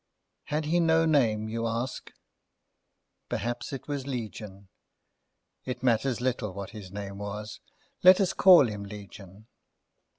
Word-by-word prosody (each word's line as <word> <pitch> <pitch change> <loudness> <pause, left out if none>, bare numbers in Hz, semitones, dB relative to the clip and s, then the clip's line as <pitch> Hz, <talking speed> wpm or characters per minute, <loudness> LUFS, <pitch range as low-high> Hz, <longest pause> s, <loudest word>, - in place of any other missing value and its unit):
Had 150 +1 -2
he 170 +3 +2
no 165 -1 +3
name, 115 -9 +2
you 115 +1 -2
ask? 115 +3 -4 1.2
Perhaps 120 +3 -3
it 135 - -7
was 140 -2 -4
Legion. 105 -6 -6 1.0
It 125 -1 -6
matters 120 0 +1
little 120 -6 -2
what 100 -1 -6
his 100 -4 -10
name 100 0 -7
was. 105 +1 -6 0.4
Let 185 0 +8
us 190 -2 +1
call 175 -8 +7
him 105 -2 -6
Legion. 100 0 -11
115 Hz, 130 wpm, -28 LUFS, 105-135 Hz, 1.2 s, Let